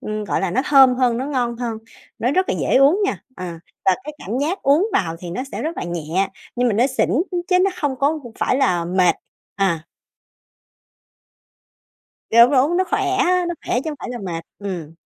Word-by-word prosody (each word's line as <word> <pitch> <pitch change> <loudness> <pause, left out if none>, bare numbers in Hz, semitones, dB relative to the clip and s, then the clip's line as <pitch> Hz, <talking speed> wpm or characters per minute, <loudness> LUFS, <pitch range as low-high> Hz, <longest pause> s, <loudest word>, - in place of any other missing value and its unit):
Ừm, 215 0 -4
gọi - - -1
là, 195 - -1
nó 240 - +1
thơm 270 -4 +6
hơn, 250 -2 +1
nó 255 - -2
ngon 245 -5 -1
hơn, 230 -2 -4 0.4
nó 245 - +1
rất 370 +4 +1
là - - +1
dễ - - +2
uống 280 +9 +5
nha. - - -2
Ờ, 185 - -6 0.4
và 190 - +5
cái 300 - -6
cảm 225 +6 -4
giác 320 +8 -2
uống 295 +9 +4
vào 165 -3 0
thì 175 -2 -7
nó 250 +9 -3
sẽ - - -4
rất 325 +2 -3
là - - -4
nhẹ, 175 +2 -2 0.3
nhưng 245 0 +2
mà 210 - 0
nó 240 +5 +3
xỉn, 265 - 0 0.2
ư, 360 - -2
chứ 365 -1 +4
nó 385 +2 +3
hông 280 -3 0
có 295 +4 +1 0.2
phải - - +1
là 180 -10 +1
mệt. 180 0 +2 0.4
À. 170 -5 0 2.5
Đúng, 235 +2 +7
đúng, 285 +5 +3
nó 375 - +2
khỏe 425 - +1 0.2
á, 365 -2 +2
nó 345 - -2
khỏe 245 - +1
chứ 315 - -2
hổng 295 - -7
phải - - -7
là 245 - -5
mệt. 165 -2 -4
Ừm. 175 -6 -6
245 Hz, 215 wpm, -20 LUFS, 190-295 Hz, 2.5 s, Đúng